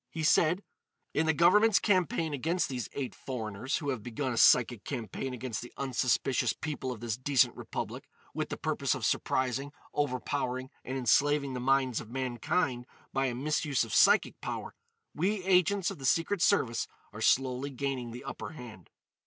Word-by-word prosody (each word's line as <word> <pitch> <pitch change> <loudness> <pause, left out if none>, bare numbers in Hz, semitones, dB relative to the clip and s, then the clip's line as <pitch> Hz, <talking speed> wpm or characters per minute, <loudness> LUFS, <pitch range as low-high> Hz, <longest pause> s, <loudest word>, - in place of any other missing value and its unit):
He 160 - -5
said: 170 +4 +3 0.5
"In 160 +2 +1
the - - +5
Government's 205 +6 +5
campaign 175 -5 +1
against 165 +6 0
these 125 -3 -4
eight 135 -3 -4
foreigners 115 -1 -4
who 145 - -3
have 130 -5 -2
begun 125 +3 -3
a - - -4
psychic 120 -3 +5
campaign 125 0 -4
against 125 -3 -4
the 120 - -9
unsuspicious 130 -1 +1
people 145 -4 -4
of 120 -3 -7
this 115 -3 -2
decent 130 0 +2
Republic, - - -6 0.3
with - - -3
the - - -4
purpose - - 0
of - - -3
surprising, 130 +2 0 0.2
overpowering 130 -1 -2
and 130 +1 -4
enslaving 140 +2 +2
the 125 - -3
minds 130 -2 +2
of 110 - -11
mankind 130 +1 -1 0.3
by 135 0 +1
a 120 - -2
misuse 145 0 0
of 115 - -6
psychic - - +4
power, - - -5 0.4
we 190 +5 0
agents 185 0 +3
of - - -9
the 135 - -6
Secret 170 +6 +1
Service 125 - +2 0.3
are 110 - -8
slowly 130 +3 +2
gaining 135 -2 -3
the 120 +2 -8
upper - - -6
hand. 115 - -11
135 Hz, 170 wpm, -30 LUFS, 125-150 Hz, 0.5 s, the